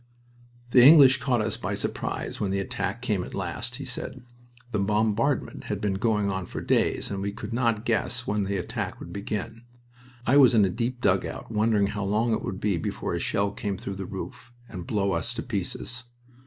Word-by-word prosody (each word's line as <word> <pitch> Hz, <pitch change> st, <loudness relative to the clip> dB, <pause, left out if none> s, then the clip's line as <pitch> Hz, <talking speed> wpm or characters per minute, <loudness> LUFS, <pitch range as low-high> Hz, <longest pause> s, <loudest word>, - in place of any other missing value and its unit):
"The 125 Hz, -1 st, +7 dB
English 135 Hz, -2 st, +9 dB
caught 125 Hz, -3 st, +1 dB
us 110 Hz, -1 st, -2 dB
by -, -, -3 dB
surprise -, -, -3 dB
when 100 Hz, -, 0 dB
the 100 Hz, -, 0 dB
attack 100 Hz, +3 st, -3 dB
came 105 Hz, -7 st, 0 dB
at -, -, -8 dB
last," 95 Hz, +6 st, -4 dB
he 140 Hz, +1 st, -6 dB
said. 130 Hz, 0 st, -5 dB, 0.5 s
"The 105 Hz, -, 0 dB
bombardment 110 Hz, +6 st, +1 dB
had -, -, -3 dB
been 105 Hz, -2 st, 0 dB
going 105 Hz, 0 st, +1 dB
on 95 Hz, -1 st, -3 dB
for -, -, -5 dB
days, -, -, +1 dB
and 100 Hz, -1 st, -3 dB
we 100 Hz, +1 st, -1 dB
could 115 Hz, +2 st, -7 dB
not 115 Hz, -2 st, +1 dB
guess 120 Hz, +1 st, 0 dB
when 105 Hz, -1 st, 0 dB
the 100 Hz, 0 st, -1 dB
attack 90 Hz, -, -4 dB
would -, -, -9 dB
begin. 105 Hz, +2 st, -4 dB, 0.6 s
I 135 Hz, -, +5 dB
was 130 Hz, -5 st, +7 dB
in 105 Hz, -3 st, +6 dB
a 95 Hz, -, 0 dB
deep 120 Hz, +4 st, -2 dB
dugout, -, -, 0 dB
wondering 110 Hz, -1 st, +3 dB
how 100 Hz, 0 st, -3 dB
long 110 Hz, +4 st, +1 dB
it -, -, 0 dB
would 95 Hz, 0 st, -4 dB
be 100 Hz, -4 st, +1 dB
before -, -, -3 dB
a -, -, -1 dB
shell 100 Hz, 0 st, 0 dB
came 100 Hz, -1 st, -3 dB
through 100 Hz, 0 st, -6 dB
the 95 Hz, -, -4 dB
roof 120 Hz, -, -7 dB, 0.2 s
and 90 Hz, -6 st, -8 dB
blow 100 Hz, -3 st, +1 dB
us 120 Hz, +4 st, -1 dB
to 115 Hz, -, -3 dB
pieces. 120 Hz, +3 st, -4 dB
105 Hz, 205 wpm, -26 LUFS, 100-120 Hz, 0.6 s, English